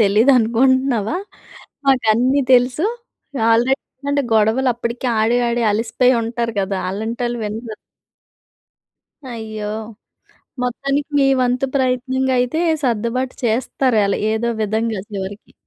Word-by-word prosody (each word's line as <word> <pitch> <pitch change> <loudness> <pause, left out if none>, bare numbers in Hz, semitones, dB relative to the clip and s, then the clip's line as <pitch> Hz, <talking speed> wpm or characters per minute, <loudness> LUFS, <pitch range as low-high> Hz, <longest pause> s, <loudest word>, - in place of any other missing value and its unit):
తెలీదనుకుంటున్నావా? 240 - +3 0.7
మాకు 265 -2 +3
అన్నీ 255 +5 +2
తెలుసు." 250 +7 +3 0.6
ఆల్రెడీ 240 +4 +3 0.3
ఏంటంటే 285 0 +1
గొడవలు 220 +5 +3
అప్పటికి 235 +2 -4
ఆడి 225 +3 +2
ఆడి 235 0 0
అలిసిపోయి 230 +4 +2
ఉంటారు 230 0 -2
కదా! 195 0 -2
అలాంటోళ్ళు 235 +4 -3
వినరు. 220 +1 -5 1.6
అయ్యో! 220 -2 -6 0.9
మొత్తానికి 275 +4 -2
మీ 275 - +4
వంతు 250 +1 +1
ప్రయత్నంగా 260 0 0
అయితే 250 +6 -1 0.2
సర్దుబాటు 245 +1 -1
చేస్తారు. 240 +2 0
ఏలా 200 - 0 0.2
ఏదో 225 +2 -1
విధంగా 220 0 -1
చివరికి. 200 0 -7
240 Hz, 105 wpm, -19 LUFS, 220-260 Hz, 1.6 s, మీ